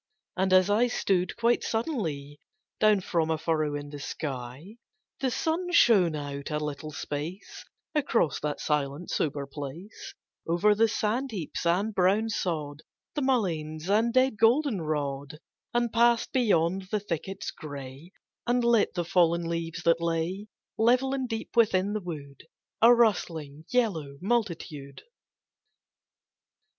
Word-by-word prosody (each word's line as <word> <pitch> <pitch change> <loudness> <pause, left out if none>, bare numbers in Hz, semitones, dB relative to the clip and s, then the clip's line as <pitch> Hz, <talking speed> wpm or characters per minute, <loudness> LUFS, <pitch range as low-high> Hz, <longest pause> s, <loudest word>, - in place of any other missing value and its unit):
And 190 0 0
as 185 -1 +6
I 215 +4 +3
stood, 185 -6 0
quite 235 +1 +2
suddenly, 160 - -3 0.4
Down 215 -2 +4
from 165 -3 0
a 160 - +1
furrow 155 -2 0
in 145 0 -6
the 145 - -7
sky 140 - -6 0.4
The 265 - 0
sun 330 +7 -1
shone 200 - +5
out 140 -1 -5
a 150 - -1
little 150 0 -4
space 150 +6 -6 0.3
Across 255 - +1
that 150 -1 -3
silent 150 +2 -2
sober 145 -2 -1
place, 155 - -8 0.3
Over 175 +6 +3
the 225 +2 +3
sand 225 +4 -1
heaps 175 - -4
and 195 +6 +1
brown 200 +4 +2
sod, 155 -8 -3 0.3
The 295 - -2
mulleins 175 - -1
and 225 +3 +3
dead 255 -2 +3
goldenrod, 155 - +1 0.3
And 240 -1 0
passed 235 +2 +3
beyond 190 - +1
the 210 - 0
thickets 195 0 -4
gray, 145 +2 -9 0.4
And 245 0 +2
lit 235 -5 +3
the 175 -2 -1
fallen 170 -1 +3
leaves 170 +1 -4
that 165 0 +3
lay, 170 +5 -2 0.3
Level 250 +4 +3
and 260 -2 -2
deep 225 0 -5
within 205 -3 +3
the 215 - -2
wood, 145 -5 -8 0.3
A 230 +2 +8
rustling 165 -10 +1
yellow 165 - 0
multitude. 170 - -3
180 Hz, 135 wpm, -28 LUFS, 150-225 Hz, 0.4 s, A